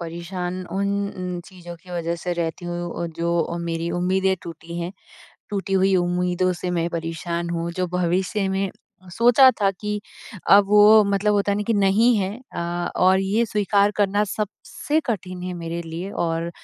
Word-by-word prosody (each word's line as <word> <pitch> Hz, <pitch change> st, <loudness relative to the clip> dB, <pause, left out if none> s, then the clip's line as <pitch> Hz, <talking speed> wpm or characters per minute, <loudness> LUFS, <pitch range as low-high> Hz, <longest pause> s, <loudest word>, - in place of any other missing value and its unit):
परेशान 175 Hz, +2 st, -5 dB
उन 200 Hz, +1 st, 0 dB, 0.3 s
उन 180 Hz, -1 st, -4 dB
चीज़ों 175 Hz, -2 st, -10 dB
की 180 Hz, +2 st, -17 dB
वजह 170 Hz, -1 st, -2 dB
से 175 Hz, +1 st, -3 dB
रहती 170 Hz, 0 st, -3 dB
हूँ 175 Hz, 0 st, -4 dB
जो 170 Hz, 0 st, 0 dB
मेरी 170 Hz, 0 st, -3 dB
उम्मीदें 190 Hz, +1 st, +2 dB
टूटी 170 Hz, 0 st, -8 dB
हैं। 175 Hz, +3 st, -4 dB, 0.6 s
टूटी 195 Hz, -1 st, -3 dB
हुई 190 Hz, 0 st, +3 dB
उम्मीदों 180 Hz, +1 st, +1 dB
से 180 Hz, -, -2 dB
मैं 170 Hz, -1 st, 0 dB
परेशान 170 Hz, +1 st, -3 dB
हूँ, 170 Hz, 0 st, -2 dB
जो 180 Hz, +1 st, -1 dB
भविष्य 180 Hz, +3 st, 0 dB
में 195 Hz, 0 st, -1 dB, 0.4 s
सोचा 245 Hz, +4 st, +6 dB
था 200 Hz, -1 st, +4 dB
कि 210 Hz, +2 st, -4 dB, 0.5 s
अ, 200 Hz, -, +9 dB
वो 210 Hz, +1 st, +7 dB
मतलब 200 Hz, +1 st, +1 dB
होता 200 Hz, 0 st, +1 dB
है 200 Hz, -, 0 dB
ना 210 Hz, -, -1 dB
कि 230 Hz, -, +2 dB
नहीं 205 Hz, +5 st, +4 dB
है 195 Hz, -2 st, 0 dB, 0.3 s
अ, -, -, -2 dB, 0.4 s
और 185 Hz, +1 st, +4 dB
ये 200 Hz, +4 st, +1 dB
स्वीकार 205 Hz, -1 st, +2 dB
करना 205 Hz, 0 st, +2 dB
सबसे 215 Hz, +9 st, -3 dB
कठिन 185 Hz, -5 st, -3 dB
है 185 Hz, -, -4 dB
मेरे 170 Hz, 0 st, -4 dB
लिए। 170 Hz, +4 st, -6 dB
और 165 Hz, -2 st, -2 dB
185 Hz, 170 wpm, -23 LUFS, 170-200 Hz, 0.6 s, अ